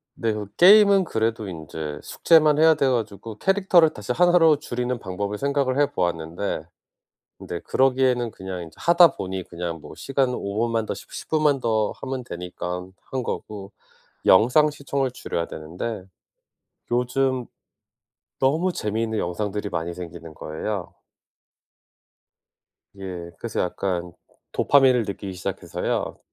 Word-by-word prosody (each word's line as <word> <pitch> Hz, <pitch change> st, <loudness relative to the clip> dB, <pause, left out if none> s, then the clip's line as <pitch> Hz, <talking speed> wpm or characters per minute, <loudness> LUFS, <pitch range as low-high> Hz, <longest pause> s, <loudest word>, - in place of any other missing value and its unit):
네 115 Hz, -1 st, -1 dB
그 105 Hz, -1 st, -4 dB
게임은 200 Hz, +1 st, +7 dB
그래도 110 Hz, -, -1 dB
인제 80 Hz, -3 st, -6 dB
숙제만 155 Hz, -2 st, +4 dB
해야 160 Hz, 0 st, +6 dB
돼 140 Hz, -2 st, +1 dB
가지고 110 Hz, -2 st, -3 dB
캐릭터를 190 Hz, -4 st, +4 dB
다시 105 Hz, +3 st, -3 dB
1 175 Hz, +4 st, +4 dB
로 160 Hz, -3 st, +6 dB
줄이는 125 Hz, -3 st, -3 dB
방법을 100 Hz, +2 st, -4 dB
생각을 140 Hz, -1 st, 0 dB
해 145 Hz, -, +5 dB
보았는데 85 Hz, -1 st, -2 dB, 0.7 s
근데 85 Hz, -, -6 dB
그러기에는 130 Hz, -3 st, +2 dB
그냥 95 Hz, -2 st, -6 dB
이제 80 Hz, -, -11 dB
하다 170 Hz, -3 st, +5 dB
보니 95 Hz, -1 st, -4 dB
그냥 85 Hz, -1 st, -5 dB
뭐 -, -, -11 dB
시간은 135 Hz, -2 st, 0 dB
5 100 Hz, 0 st, -3 dB
분만 115 Hz, -1 st, 0 dB
더 -, -, -3 dB
십 -, -, -12 dB
십분만 150 Hz, -4 st, +1 dB
더 110 Hz, -2 st, +1 dB
하면 130 Hz, -1 st, -4 dB
되니깐 90 Hz, -1 st, -6 dB
한 130 Hz, -2 st, -4 dB
거고 100 Hz, -3 st, -5 dB, 0.5 s
영상 125 Hz, +10 st, +6 dB
시청을 140 Hz, -2 st, -2 dB
줄여야 85 Hz, -8 st, -4 dB
되는데 90 Hz, +6 st, -6 dB, 0.9 s
요즘 125 Hz, +1 st, 0 dB, 0.9 s
너무 160 Hz, +7 st, +2 dB
재미있는 110 Hz, -1 st, -2 dB
영상들이 105 Hz, +3 st, -2 dB
많이 85 Hz, +1 st, -3 dB
생기는 85 Hz, -2 st, -9 dB
거예요. 90 Hz, +6 st, -5 dB, 2.0 s
예 90 Hz, -3 st, -6 dB
그래서 115 Hz, -, -3 dB
약간 90 Hz, -1 st, -2 dB, 0.4 s
도파민을 130 Hz, -4 st, +4 dB
느끼기 100 Hz, -1 st, -5 dB
시작해서요. 90 Hz, -, -3 dB
115 Hz, 285 characters per minute, -24 LUFS, 90-135 Hz, 2.0 s, 게임은